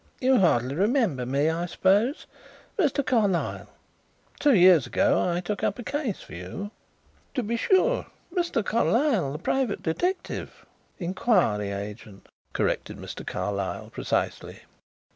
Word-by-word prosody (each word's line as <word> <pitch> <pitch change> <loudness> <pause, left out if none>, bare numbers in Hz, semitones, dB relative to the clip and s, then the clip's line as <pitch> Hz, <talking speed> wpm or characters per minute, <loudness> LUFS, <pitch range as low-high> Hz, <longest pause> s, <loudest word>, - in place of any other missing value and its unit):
"You 260 0 +4
hardly 130 -8 +2
remember 195 - +1
me, 140 +4 +1
I 170 +2 -2
suppose? 205 - +2 0.5
Mr. 290 -7 +1
Carlyle 210 -9 0 0.7
two 290 -4 +4
years 180 -4 +6
ago - - +2
I 175 0 -1
took 200 +2 -4
up 200 - 0
a 245 - -6
case 275 -6 -3
for - - -13
you 90 - -6 0.3
" - - -35
"To 255 - 0
be 230 +2 -1
sure. 380 - +2 0.3
Mr. 345 - 0
Carlyle, 230 - +2
the 150 - -4
private 240 - -1
detective 355 - -3 0.2
" - - -39
"Inquiry 180 - +1
agent," 100 0 -8 0.2
corrected - - -1
Mr. - - -8
Carlyle 100 +1 -3
precisely. - - -2
195 Hz, 135 wpm, -26 LUFS, -, 0.7 s, years